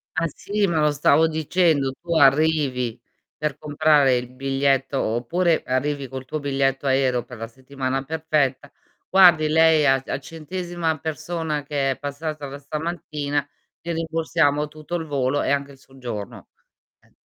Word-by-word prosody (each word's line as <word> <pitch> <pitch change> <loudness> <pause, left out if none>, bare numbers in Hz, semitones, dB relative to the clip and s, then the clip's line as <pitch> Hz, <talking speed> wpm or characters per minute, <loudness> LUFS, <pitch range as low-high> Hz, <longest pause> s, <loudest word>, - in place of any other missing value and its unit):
Ah, - - +1
sì, 205 0 -1
ma 170 -4 0
lo 150 -1 +3
stavo 150 +2 +4
dicendo, 160 -3 +1
tu 170 -1 -2
arrivi 135 -5 +3 0.4
per 150 -2 -2
comprare 150 -3 +3
il 125 0 -5
biglietto, 135 0 0
oppure 160 +10 +1
arrivi 140 +2 -1
col 130 +1 -7
tuo 155 +4 -4
biglietto 135 -1 0
aereo 130 -2 +2
per 125 - -11
la 115 +1 -6
settimana 130 +2 -4
perfetta: 150 -3 -1 0.4
"Guardi 175 -5 +6
lei 160 -1 +4
a 135 -1 +4
a - - -3
centesima 165 +2 -4
persona 160 0 -3
che 140 -2 -1
è - - -5
passata 145 +1 -5
da 140 +1 -8
stamattina, 145 -1 -3 0.3
gli 170 - -5
rimborsiamo 160 -2 0
tutto 155 +3 -7
il 165 -2 -3
volo 140 -1 0
e - - 0
anche 140 0 -1
il 135 - -17
soggiorno." 125 -7 -8 0.5
Eh, - - -29
145 Hz, 150 wpm, -23 LUFS, 135-160 Hz, 0.5 s, Guardi